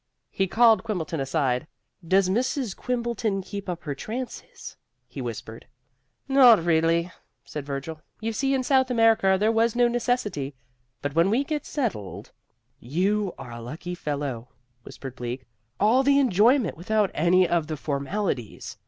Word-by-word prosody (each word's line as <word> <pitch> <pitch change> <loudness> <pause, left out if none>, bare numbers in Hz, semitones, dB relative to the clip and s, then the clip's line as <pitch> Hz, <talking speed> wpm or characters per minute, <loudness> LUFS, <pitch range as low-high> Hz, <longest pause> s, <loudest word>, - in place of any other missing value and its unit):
He 195 - 0
called 225 +2 +5
Quimbleton 170 -8 -3
aside. 135 -1 0 0.4
"Does 185 +3 +3
Mrs. 245 +2 -1
Quimbleton 235 -5 -2
keep 200 0 -7
up 175 -1 -4
her 145 - -3
trances?" 250 - -7 0.3
he 130 +2 -7
whispered. 115 -1 -7 0.6
"Not 250 -9 +6
recently," 165 +1 +2 0.3
said 145 -2 -7
Virgil. 145 +3 -5 0.2
"You 225 +1 -3
see, 270 +4 +1
in 260 - 0
South 260 0 +3
America 225 -5 +4
there 215 +2 +3
was 230 0 +2
no 245 0 +4
necessity 235 - -1 0.5
but 145 -1 -2
when 165 +4 +3
we 240 +7 +2
get 300 +1 -4
settled 225 - -4 0.3
" 125 +3 -47 0.2
"You 205 0 +1
are 125 -3 -9
a 115 0 -8
lucky 155 +9 -6
fellow," 140 -7 -4 0.3
whispered 130 +2 -9
Bleak. 125 +1 -5 0.3
"All 225 +6 +4
the 280 +1 +4
enjoyment 240 -2 +3
without 210 +3 +1
any 180 +3 +3
of 170 -3 0
the 155 -1 -4
formalities!" 140 - -3
190 Hz, 150 wpm, -25 LUFS, 145-235 Hz, 0.6 s, Not